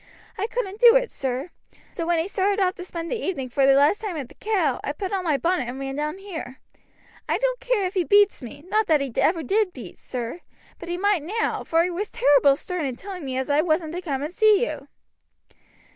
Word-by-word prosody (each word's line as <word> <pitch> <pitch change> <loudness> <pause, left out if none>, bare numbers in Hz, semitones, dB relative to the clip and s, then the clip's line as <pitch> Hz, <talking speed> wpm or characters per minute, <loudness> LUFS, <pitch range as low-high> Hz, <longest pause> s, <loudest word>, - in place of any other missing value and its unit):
I 410 - -2
couldn't 440 -4 -4
do 475 0 +8
it, - - +2
sir. 265 +5 -3 0.4
So 335 - -3
when 345 -1 +2
he 325 +2 0
started 400 0 0
off 370 -2 +2
to 360 - -8
spend 335 -2 -6
the 480 - -2
evening 270 -9 -3
for 270 +2 +2
the 270 - +6
last 290 +9 +4
time 400 -7 -4
at 270 -5 -5
the - - -15
'Cow' 425 -3 0
I - - -2
put 390 -1 -5
on 380 -2 -1
my 310 -5 +1
bonnet 335 -5 0
and 255 +2 -6
ran 270 0 -4
down 300 +4 -3
here. 335 -10 -7 0.7
I - - +2
don't - - 0
care - - 0
if 365 - -3
he 370 -3 +1
beats 410 +3 +4
me 285 +4 -10
not 430 +2 +1
that 310 -2 +4
he 270 -4 -4
ever 330 -1 +2
did 405 0 +1
beat 230 -9 -10
sir, 245 +5 -5 0.4
but 340 - -8
he 350 - -2
might 405 -2 +2
now 425 +10 -2
for 330 +1 +2
he 360 - -1
was 400 +4 -3
terrible 280 0 +4
stern 355 +1 -4
in 255 - -4
telling 375 +4 -8
me 260 -2 -3
as 265 - -1
I 290 +1 +3
wasn't 315 -1 0
to 355 - -4
come 280 -6 -3
and 305 +4 -5
see 430 +3 +4
you." - - -6
345 Hz, 240 wpm, -24 LUFS, 285-405 Hz, 0.7 s, do